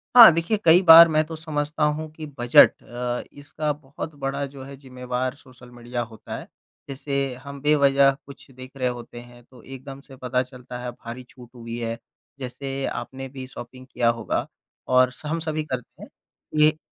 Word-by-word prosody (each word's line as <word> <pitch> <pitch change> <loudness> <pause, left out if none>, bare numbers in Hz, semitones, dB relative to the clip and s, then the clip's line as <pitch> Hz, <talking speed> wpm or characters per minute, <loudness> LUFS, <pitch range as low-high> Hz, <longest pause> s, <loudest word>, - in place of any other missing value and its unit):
हाँ, 235 -7 +12
देखिए 165 +7 0
कई 170 +3 +7
बार 170 -1 +10
मैं 155 -1 +2
तो 160 +1 -7
समझता 155 -1 -3
हूँ 150 +1 0
कि 155 0 -9
बजट 120 0 +6
अ, 120 0 -4
इसका 150 +1 -4
बहुत 145 +1 -9
बड़ा 140 +1 -2
जो 135 -1 -10
है 140 +1 -10
ज़िम्मेवार 125 -1 -4
सोशल 130 -3 -17
मीडिया 120 0 -5
होता 115 -2 -8
है, - - -10 0.4
जैसे 140 -1 -2
हम 140 -1 -9
बेवज़ह 140 -2 +4
कुछ 140 0 -14
देख 130 0 -12
रहे 130 -1 0
होते 120 -1 -8
हैं 120 0 -16
तो 125 -1 -18
एकदम 135 +1 -10
से 135 -1 -15
पता 125 0 -1
चलता 125 -1 -10
है 125 - -4
भारी 120 +2 -9
छूट 125 -2 -15
हुई 115 0 -7
है, 115 0 -3 0.4
जैसे 135 +1 -5
आपने 135 0 -5
भी 130 -1 -8
शॉपिंग 130 0 -11
किया 120 -1 +2
होगा 115 -1 -1 0.4
और 125 0 +4
स 150 - -13
हम 160 +3 -2
सभी 155 -1 -2
करते 130 -5 -7
हैं - - -11 0.5
ये 155 0 +5
135 Hz, 185 wpm, -24 LUFS, 125-150 Hz, 0.5 s, हाँ